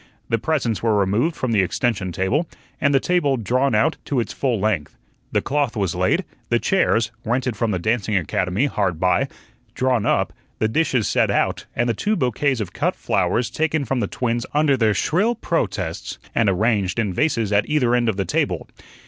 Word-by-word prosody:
The 115 - +1
presents 125 -6 -1
were 110 -2 +2
removed 105 - +1
from 130 - -2
the 105 -3 +4
extension 95 +1 -1
table 105 - 0 0.3
and 140 - +3
the 135 - +4
table 145 -5 +1
drawn 125 +3 +1
out 155 +10 +2
to 140 - 0
its 115 - -3
full 125 -6 0
length. 95 -8 -1 0.3
The - - +1
cloth 140 -4 0
was 100 -5 0
laid, - - +1 0.2
the 120 - +3
chairs 115 - +1
rented 125 +1 -1
from 115 +2 0
the 100 - 0
dancing 110 +2 0
academy 90 - 0
hard 95 - -1
by 95 +10 +2 0.5
drawn 125 -4 +1
up, - - +1 0.2
the 110 - +1
dishes 130 -2 +1
set - - +2
out, - - 0
and 120 +1 +1
the 120 - +2
two 210 - 0
bouquets 130 - 0
of 95 -5 -4
cut - - 0
flowers 120 -1 0
taken 155 +1 0
from 130 +1 -1
the 105 - 0
twins 120 +1 -1
under 150 -2 +4
their 110 -4 +2
shrill 205 +9 +1
protests, 95 - -2 0.2
and 110 - +3
"arranged" 100 -1 +1
in 105 -5 0
vases 115 - 0
at 100 0 +2
either 135 -6 +2
end 120 -1 +2
of 105 - -2
the 95 - 0
table. - - -1
115 Hz, 190 wpm, -22 LUFS, 105-135 Hz, 0.5 s, the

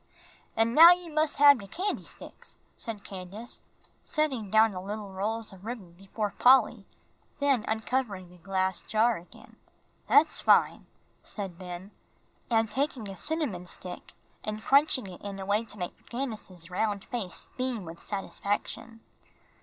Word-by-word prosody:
"An' 225 +1 +2
now 330 +5 +11
you 350 -2 -7
mus' 310 -1 +2
hab 285 -2 +7
de 200 - -9
candy 375 - -3
sticks," - - -11 0.2
said 215 -3 -7
Candace, 195 +5 -7 0.4
setting 270 -9 -1
down 220 +2 +5
the 185 -2 -6
little 205 +1 -6
rolls 215 +3 -3
of 190 0 -14
ribbon 220 -6 -6
before 195 +3 -4
Polly, 245 -5 +5 0.5
then 275 -6 +2
uncovering 220 -4 -1
the 180 - -16
glass 190 0 0
jar 225 +1 +2
again. 170 +1 -15 0.5
"That's 315 - +5
fine," - - +3 0.3
said 190 -5 -6
Ben, 180 +2 -8 0.7
taking 260 -1 -2
a 195 - -7
cinnamon 275 - 0
stick 180 0 -6 0.3
and 215 0 -4
crunching 275 -3 +4
it 185 -2 -10
in 200 -1 -6
a 190 - -5
way 205 +3 +1
to 210 - -8
make 180 -2 -7
Candace's 215 -9 -6
round 205 +1 -1
face 230 -9 -4
beam 250 -6 -2
with 165 +1 -10
satisfaction. 205 +3 -3
215 Hz, 145 wpm, -29 LUFS, 190-250 Hz, 0.7 s, now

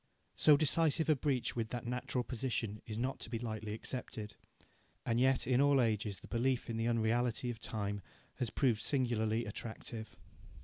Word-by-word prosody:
So 150 -2 +7
decisive 160 +1 +2
a 155 - +6
breach 135 -2 0
with 115 -2 -1
that 120 0 -4
natural 125 +1 -1
position 115 -4 -3
is 110 -1 -4
not 130 +3 -1
to - - -6
be 115 - -2
lightly 110 -2 -4
accepted. 110 -3 -6 0.7
And 115 0 +1
yet 130 0 +3
in 125 +2 +3
all 140 -1 +5
ages 105 -4 +1
the - - -11
belief 125 0 0
in 115 - -3
the 115 +1 0
unreality 120 +1 +1
of 115 - -8
time 100 -3 -3 0.4
has 120 - 0
proved 120 -5 +2
singularly 115 -4 +1
attractive. 110 +1 -6
120 Hz, 170 wpm, -35 LUFS, 110-130 Hz, 0.7 s, So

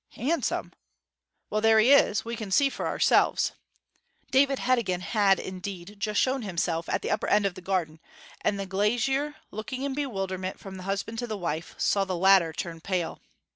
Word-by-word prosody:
'Handsome? 300 +9 -1 0.8
Well, 215 - 0
there 225 0 +5
he 230 +5 +5
is 250 -7 +4
we 230 +1 -4
can 220 -3 -6
see 275 +8 +3
for - - -3
ourselves.' - - +3 0.8
David 275 +1 +4
Heddegan 235 -9 0
had, 200 -1 +3
indeed, 190 +1 -7
just 210 0 0
shown 265 0 +1
himself 170 -4 -2
at - - -1
the - - -2
upper 210 - 0
end 210 -1 +3
of 195 - 0
the 185 - -10
garden; 175 -4 -2 0.4
and 200 -1 +1
the 195 - -3
glazier, 240 +9 0 0.2
looking 255 +5 -5
in 280 -1 -2
bewilderment 195 -9 -3
from 190 -1 -9
the 185 - -8
husband 210 +3 -3
to 240 - -3
the 215 -2 -4
wife, 170 -2 -4
saw 200 - +2
the 185 -2 -3
latter 190 -2 +5
turn 165 0 -6
pale. 180 -2 -2
200 Hz, 180 wpm, -27 LUFS, 185-235 Hz, 0.8 s, there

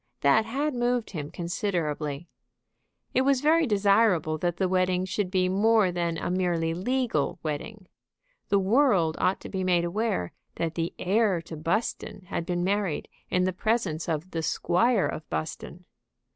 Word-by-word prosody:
That 215 +11 +4
had 285 +5 -1
moved 245 -1 0
him 150 -6 -5
considerably. 170 -4 -3 0.9
It 260 - +3
was 270 -1 +2
very 315 +1 +4
desirable 200 -6 +3
that 175 0 -1
the 190 - +1
wedding 185 0 +1
should 190 0 -2
be 185 -1 +1
more 205 +1 +3
than 170 -1 -1
a 175 - -3
merely 175 -3 0
legal 225 - -1
wedding. 185 +7 -5 0.6
The 200 - +4
world 195 - +3
ought 185 - +1
to - - -8
be 190 -1 -3
made 175 -2 +2
aware 185 - -1 0.2
that 165 -1 -2
the 165 0 -3
heir 200 -1 +2
to 165 - -8
Buston 190 +5 -2
had 170 - -3
been 175 -1 -1
married 195 -3 -1 0.2
in 180 - +2
the 185 0 0
presence 185 -6 -1
of 165 +3 -3
the 165 - -2
Squire 195 +7 +2
of 155 - -5
Buston. 80 -1 -5
185 Hz, 160 wpm, -27 LUFS, 165-220 Hz, 0.9 s, That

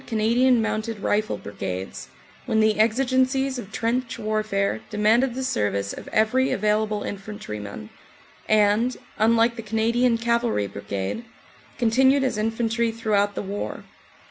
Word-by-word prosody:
Cana 220 -3 -1
dian 250 -1 +4
Mounted 215 -1 -3
Rifle 215 +1 0
Brigades, 95 -2 -6 0.4
when 220 - +2
the 215 -1 +3
exigencies 260 +3 +2
of 205 -3 -9
trench 235 +2 -1
warfare 215 - -1
demanded 225 +4 +2
the 265 - -3
service 100 - -1
of - - -9
every 250 +5 +2
available 210 0 0
infantryman, 105 - -7 0.6
and, 215 +3 +3 0.2
unlike 230 +2 +3
the - - -4
Canadian 230 +2 +1
Cavalry 235 - 0
Brigade, 100 - -4 0.5
continued 265 +4 +3
as 255 -5 -1
infantry 225 +1 0
throughout 210 -3 0
the - - -3
war. 200 +1 -5
220 Hz, 125 wpm, -24 LUFS, 205-235 Hz, 0.6 s, dian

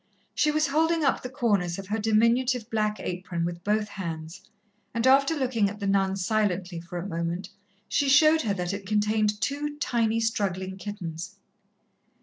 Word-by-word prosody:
She 305 - +2
was 305 0 +2
holding 320 +2 +2
up 275 - +2
the 250 - -6
corners 200 -9 0
of 195 - -6
her 220 +2 -1
diminutive 230 +2 +2
black 215 -1 0
apron 180 -1 -3
with 170 0 -5
both 210 +1 +1
hands, 165 -2 -6 0.5
and 230 +1 0
after 275 +4 +5
looking 245 -7 +1
at 205 +1 -9
the 200 - -3
nun 195 -1 +2
silently 190 -3 -1
for 170 +1 -7
a 175 - -4
moment, 170 +2 -3 0.4
she 285 -2 +1
showed 310 +3 +6
her 210 -8 0
that 180 0 -2
it 200 -1 -6
contained 210 0 +1
two 290 +3 -2
tiny, 230 -4 +1
struggling 190 -4 -1
kittens. 185 -2 -6
210 Hz, 165 wpm, -27 LUFS, 185-245 Hz, 0.5 s, showed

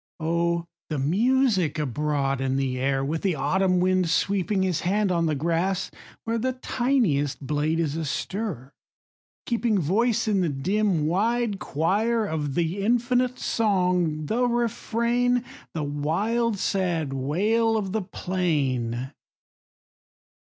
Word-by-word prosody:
O 170 +1 0 0.2
the 155 - -2
music 195 - +2
abroad 140 -1 -1
in 135 0 0
the 130 -2 -1
air, 135 +1 0
With 160 +3 -2
the 190 -4 +1
autumn 185 +2 +1
wind 185 -1 +2
sweeping 195 +3 +1
His 185 -4 0
hand 200 +2 +1
on 170 -2 +1
the 155 - 0
grass, 170 +5 -1 0.3
where 230 0 -1
The 255 +3 0
tiniest 235 - 0
blade 150 +3 0
is 155 -3 0
astir, 165 - -4 0.7
keeping 235 -3 +1
Voice 225 +8 +1
in 200 -3 +2
the 175 - +1
dim, 180 +3 0
wide 210 +5 0
choir, 215 - 0
Of 150 -6 -3
the 170 +3 0
infinite 245 +2 +1
song, 180 -7 +1
the 245 +9 +1
refrain, 240 +1 0 0.3
The 155 - -1
wild, 200 +11 0
sad 175 -8 -1
wail 210 - +1
of 195 -3 -2
the 220 +2 0
plain 135 -10 -1
180 Hz, 125 wpm, -25 LUFS, 150-220 Hz, 0.7 s, music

